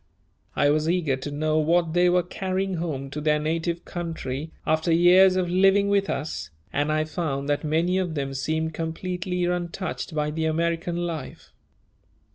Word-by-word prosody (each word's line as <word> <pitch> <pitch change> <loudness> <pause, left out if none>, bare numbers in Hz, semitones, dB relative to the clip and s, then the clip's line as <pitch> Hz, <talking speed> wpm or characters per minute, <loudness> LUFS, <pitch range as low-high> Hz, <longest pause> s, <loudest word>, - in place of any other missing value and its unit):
I 145 - +3
was 155 +1 +1
eager 170 -6 +1
to 130 +2 -6
know 155 +2 0
what 165 +1 +2
they 175 +1 +4
were 180 0 +3
carrying 190 +1 -2
home 140 -5 -4
to 150 - -4
their 150 0 +3
native 165 +3 -2
country 160 -4 -4 0.2
after 160 +2 +1
years 180 +3 +6
of 185 -1 +1
living 195 +3 +4
with 200 0 +2
us, 135 - -3 0.2
and 145 +1 +1
I 155 0 +2
found 155 -4 -3
that 145 +2 0
many 165 +4 +1
of 175 -4 -2
them 135 -2 -2
seemed 160 +4 -1
completely 180 +2 -3
untouched 175 -1 -3
by 150 0 0
the 160 +1 -2
American 170 +2 0
life. 165 -2 -6
165 Hz, 165 wpm, -25 LUFS, 155-180 Hz, 0.2 s, years